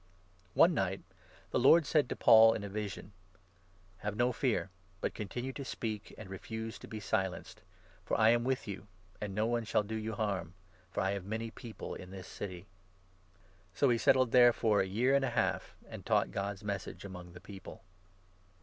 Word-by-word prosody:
One 175 - +6
night 95 - -1 0.5
the - - +2
Lord 155 +6 +6
said 150 -4 +2
to - - -2
Paul, 115 0 +7
in 105 - -4
a - - -4
9 100 - -11
vision: 105 -1 -5 0.5
" 90 -1 -32
Have 105 +1 -4
no 120 +3 +2
fear, 110 - 0 0.3
but - - -2
continue 120 +6 -4
to 140 - -6
speak, 110 -5 -4
and 110 - -9
refuse 110 +4 -6
to - - -11
be 110 - -6
silenced; 95 -2 -2 0.4
for - - -1
I 110 0 +6
am 120 0 +4
with 130 -1 -1
you, 100 0 -6 0.3
and 100 -2 -4
no 105 +1 +1
one 120 0 0
shall 110 - +1
do 105 +2 -6
you 110 0 -3
harm, 95 -5 -2 0.3
10 90 - -33
for - - 0
I 95 +1 +1
have 100 -2 -3
many 110 +2 -3
People 115 -1 -8
in 90 - -9
this 95 -1 -8
city." 95 -3 -7 1.1
So 140 - +3
he 120 -1 +3
settled 130 -1 +4
there 120 -1 +8
for 110 -2 +2
a 95 - -1
year 120 +8 +2
and 140 0 +4
a 135 - +1
half, 115 -2 -1
and - - -9
taught - - +2
God's 100 0 -3
n - - -11
Message 100 0 -4
among 90 -2 -9
the 90 - -10
people. 95 0 -11
105 Hz, 205 wpm, -33 LUFS, 95-120 Hz, 1.1 s, there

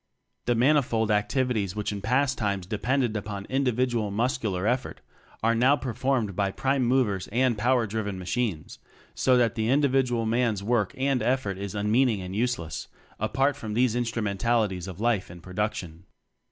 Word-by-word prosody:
The 120 - +2
manifold 120 -4 +2
activities 105 -2 0
which 105 0 -2
in 100 -1 -5
past 130 +5 +1
times 100 -4 -2
depended 120 +4 0
upon 100 -1 -4
individual 125 -4 0
muscular 110 -3 -1
effort 125 +3 -1 0.4
are 115 +1 +4
now 125 +5 +4
performed 125 -5 -1
by 100 0 +1
prime 135 +6 0
movers 120 -7 +1
and 125 +2 +1
power 120 +2 +2
driven 105 -2 -3
machines, 95 -2 -3 0.3
so 130 -1 +3
that 120 -3 +3
the 110 0 -1
individual 130 -4 +2
man's 115 -3 +1
work 105 -3 0
and 135 -1 +1
effort 120 -7 0
is 100 0 -5
unmeaning 110 +2 +2
and 90 +1 -6
useless 110 -9 -2 0.3
apart 135 +7 +1
from 110 -2 -6
these 120 -1 +2
instrumentalities 110 -4 0
of 95 -1 -8
life 115 -4 0
and 85 -1 -12
production. 95 -3 -4
115 Hz, 155 wpm, -26 LUFS, 100-125 Hz, 0.4 s, are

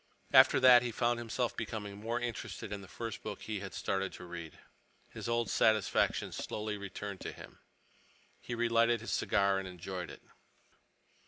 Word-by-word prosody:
After - - +8
that 125 -2 +8
he 120 -1 -2
found 120 +1 +1
himself 120 +1 -2
becoming 105 -2 -4
more 115 +4 -2
interested 115 -3 -5
in 100 - -5
the 95 - -11
first 115 +4 -6
book 105 -2 -6
he 105 -2 -3
had 95 -1 -6
started 95 -1 -1
to - - -9
read. 85 -2 -8 0.5
His - - -6
old 115 0 +1
satisfaction 110 -2 +2
slowly 105 0 -3
returned 100 -1 -6
to - - -4
him. - - -13 0.8
He 120 - -5
relighted 115 0 +3
his 115 - -4
cigar 100 -1 +2
and 95 - -5
enjoyed 90 0 -6
it. - - -11
110 Hz, 165 wpm, -33 LUFS, 95-115 Hz, 0.8 s, After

